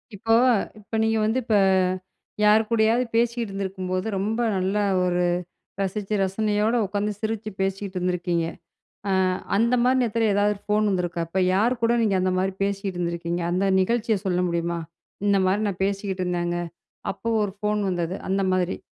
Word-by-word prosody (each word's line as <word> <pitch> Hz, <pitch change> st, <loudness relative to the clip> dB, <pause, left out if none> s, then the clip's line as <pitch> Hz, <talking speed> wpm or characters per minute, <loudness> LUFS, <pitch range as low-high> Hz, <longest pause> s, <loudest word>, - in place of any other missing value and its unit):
இப்போ 225 Hz, +3 st, 0 dB, 0.5 s
இப்ப 210 Hz, +2 st, -7 dB
நீங்க 225 Hz, 0 st, +2 dB
வந்து 225 Hz, +4 st, +1 dB
இப்ப 225 Hz, -2 st, +1 dB, 0.9 s
யார் 210 Hz, +1 st, +6 dB
கூடயாவது 230 Hz, +2 st, +3 dB
பேசிகிட்டிருந்திருக்கும்போது 195 Hz, -5 st, -1 dB
ரொம்ப 215 Hz, +4 st, -1 dB, 0.2 s
நல்லா 195 Hz, +3 st, 0 dB, 0.2 s
ஒரு 180 Hz, 0 st, +1 dB, 0.6 s
ரசிச்சு, 195 Hz, +2 st, -2 dB
ரசனையோட 210 Hz, +3 st, +1 dB
உட்காந்து 205 Hz, +2 st, -1 dB
சிரிச்சு 220 Hz, 0 st, -3 dB
பேசிகிட்ருந்திருக்கீங்க. 180 Hz, -3 st, -1 dB, 0.9 s
அ -, -, -2 dB, 0.2 s
அந்த 235 Hz, +3 st, +3 dB
மாரி 255 Hz, +1 st, +3 dB
நேரத்துல, 230 Hz, -1 st, +1 dB
எதாவது 205 Hz, +1 st, +2 dB
ஒரு 200 Hz, -, -16 dB
ஃபோன் 210 Hz, 0 st, +2 dB
வந்திருக்கா? 175 Hz, -3 st, -1 dB
அப்ப 180 Hz, +3 st, -2 dB
யார் 235 Hz, +5 st, +2 dB
கூட 230 Hz, +1 st, +4 dB
நீங்க 205 Hz, -4 st, +2 dB
அந்த 185 Hz, 0 st, +1 dB
மாரி 190 Hz, +1 st, 0 dB
பேசிட்டிருந்திருக்கீங்க? 175 Hz, -4 st, -2 dB
அந்த 185 Hz, +2 st, +1 dB
நிகழ்ச்சிய 220 Hz, +1 st, +1 dB
சொல்ல 180 Hz, -1 st, +1 dB
முடியுமா? 170 Hz, 0 st, -1 dB, 0.5 s
"இந்த 200 Hz, -1 st, +4 dB
மாரி 195 Hz, +3 st, +2 dB
நான் 190 Hz, -1 st, -4 dB
பேசிக்கிட்ருந்தேங்க, 185 Hz, -3 st, -2 dB, 0.6 s
அப்ப -, -, -27 dB, 0.2 s
ஒரு 205 Hz, -2 st, -1 dB
ஃபோன் 210 Hz, 0 st, 0 dB
வந்தது." 175 Hz, 0 st, -2 dB
அந்த 195 Hz, 0 st, +1 dB
மாதிரி. 185 Hz, 0 st, 0 dB
195 Hz, 145 wpm, -24 LUFS, 185-215 Hz, 0.9 s, யார்